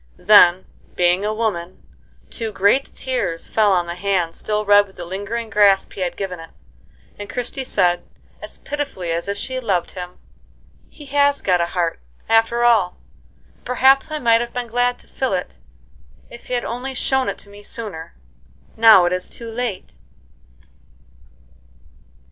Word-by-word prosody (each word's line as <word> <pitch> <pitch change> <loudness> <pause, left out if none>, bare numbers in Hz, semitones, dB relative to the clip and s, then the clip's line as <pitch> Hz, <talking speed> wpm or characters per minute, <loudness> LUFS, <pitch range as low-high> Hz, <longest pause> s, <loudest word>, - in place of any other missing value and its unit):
Then, 185 -3 +6 0.3
being 180 +2 +2
a 210 - 0
woman, 210 -6 -3 0.5
two 225 -2 -4
great 205 +7 +2
tears 250 -11 -4
fell 215 -2 +3
on 180 -2 +2
the 170 - -5
hand 180 -2 -1
still 210 +3 -3
red 205 0 +5
with 190 - -20
the 175 - -7
lingering 205 +5 -5
grasp 200 -2 +3
he 195 - -7
had 175 -1 -2
given 185 -3 -5
it, 165 0 -11 0.7
and 205 0 -7
Christie 250 +2 -4
said, 175 -8 +1 0.4
as - - -10
pitifully 280 - -5
as 170 +2 -2
if 200 0 -3
she 260 +4 -4
loved 195 -8 -1
him: 180 -1 -8 0.7
"He 295 - -14
has 285 0 +2
got 180 -2 +1
a 170 - 0
heart, 170 -2 -2 0.3
after 225 +1 +2
all, 225 -7 +3 0.6
and - - -32
perhaps 265 +3 +3
I 310 - -3
might 230 -4 +3
have 240 - -5
been 245 -1 -3
glad 245 +1 +1
to - - -15
fill 260 -5 -2
it 180 - -6 0.7
if 235 - -12
he 250 - -2
had 240 - -2
only 255 +3 -5
shown 265 +1 0
it - - -5
to 200 - -12
me 205 0 -13
sooner. 205 -7 -7 0.6
Now 220 -5 +7
it 175 - +1
is 185 0 -3
too 230 -1 -8
late." 225 -5 -5
210 Hz, 165 wpm, -20 LUFS, 180-245 Hz, 0.7 s, Now